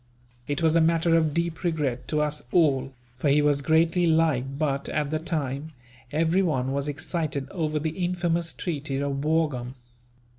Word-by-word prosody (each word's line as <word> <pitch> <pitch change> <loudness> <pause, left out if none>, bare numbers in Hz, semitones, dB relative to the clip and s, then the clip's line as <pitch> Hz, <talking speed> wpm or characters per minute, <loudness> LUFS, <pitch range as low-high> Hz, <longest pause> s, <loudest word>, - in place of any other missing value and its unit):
It 145 +3 -2
was 160 0 +4
a 165 - +5
matter 165 +1 +3
of 160 -2 +3
deep 170 +1 -2
regret 150 -8 -1
to 150 -1 0
us 150 0 -1
all, 135 -6 +3 0.3
for 145 - +1
he 145 +2 +4
was 145 -1 +2
greatly 165 +3 +3
liked 150 -5 +1
but, 140 -3 -1
at 150 -2 -1
the 155 - 0
time, 155 -2 -3 0.4
everyone 160 -4 +1
was 140 +1 -2
excited 145 -1 -2
over 155 -4 -1
the 155 +1 -1
infamous 175 -2 0
treaty 145 -5 -3
of 140 0 -2
Wurgaum. 150 -6 0
155 Hz, 160 wpm, -26 LUFS, 140-165 Hz, 0.4 s, a